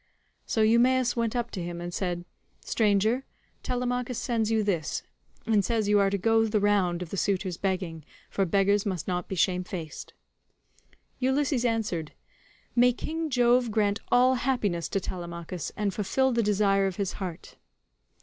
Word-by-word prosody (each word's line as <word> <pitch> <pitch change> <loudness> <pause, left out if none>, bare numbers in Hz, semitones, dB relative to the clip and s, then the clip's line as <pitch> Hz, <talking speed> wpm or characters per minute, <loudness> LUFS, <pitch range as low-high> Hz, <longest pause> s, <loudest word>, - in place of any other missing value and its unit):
So 220 - +2
Eumaeus 245 +3 +3
went 230 -1 -1
up 240 -1 -2
to 185 - -4
him 170 0 -5
and 175 0 -6
said, 175 -2 -2 0.4
"Stranger, 220 +4 +2 0.4
Telemachus 250 0 -2
sends 230 -3 0
you 220 -1 +2
this, 175 -7 -1 0.4
and 215 -3 +3
says 220 +1 0
you 205 0 +4
are 200 -1 +3
to 200 - 0
go 225 +3 +3
the 210 0 +1
round 190 -4 +2
of 170 - -11
the 195 - -3
suitors 190 -2 0
begging, 185 -4 -3 0.2
for 195 - 0
beggars 200 +2 +2
must 185 -6 -3
not 180 -1 -2
be 190 - -4
shamefaced." 180 -3 -2 1.1
Ulysses 265 -1 +1
answered, 210 -9 -1 0.6
"May 245 0 +5
King 320 +5 -4
Jove 245 -2 +3
grant 205 -1 +1
all 250 +1 +5
happiness 205 - 0
to 195 - 0
Telemachus, 170 -2 -6
and 205 -2 0
fulfil 265 +6 +1
the 235 -1 +2
desire 200 -2 +2
of 190 - -3
his 195 -1 -2
heart." 180 -4 -6
205 Hz, 160 wpm, -27 LUFS, 185-235 Hz, 1.1 s, May